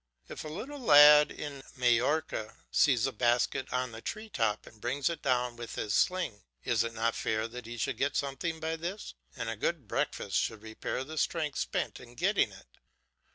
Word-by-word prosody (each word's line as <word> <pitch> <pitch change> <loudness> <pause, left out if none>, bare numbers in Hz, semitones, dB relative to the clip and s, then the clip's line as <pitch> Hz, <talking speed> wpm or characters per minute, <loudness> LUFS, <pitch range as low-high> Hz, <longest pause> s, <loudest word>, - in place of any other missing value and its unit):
If - - -7
a - - -6
little 250 - -6
lad 150 - +8
in 145 -2 -6
Majorca 125 0 +1 0.2
sees 125 -6 +4
a 135 - 0
basket 120 +2 +1
on 125 -1 -1
the 110 0 -9
tree 215 - -5
top 110 - 0
and 110 - -16
brings 140 +6 0
it 170 - -6
down 125 -1 0
with 120 -1 -7
his 105 - -2
sling, 175 - +1 0.2
is 115 -2 +2
it 115 -1 -5
not 115 +1 +1
fair 110 +1 -1
that 120 0 -9
he 120 +1 -7
should - - -1
get 140 +1 0
something 160 +4 -2
by 160 +1 -2
this, 180 +6 -5 0.2
and - - -4
a - - -2
good - - -2
breakfast - - -1
should 110 -1 -1
repair 110 +3 -4
the 155 +3 -5
strength 155 -4 -1
spent - - -2
in 120 0 -14
getting 195 - +2
it. - - -17
130 Hz, 195 wpm, -31 LUFS, 115-160 Hz, 0.2 s, lad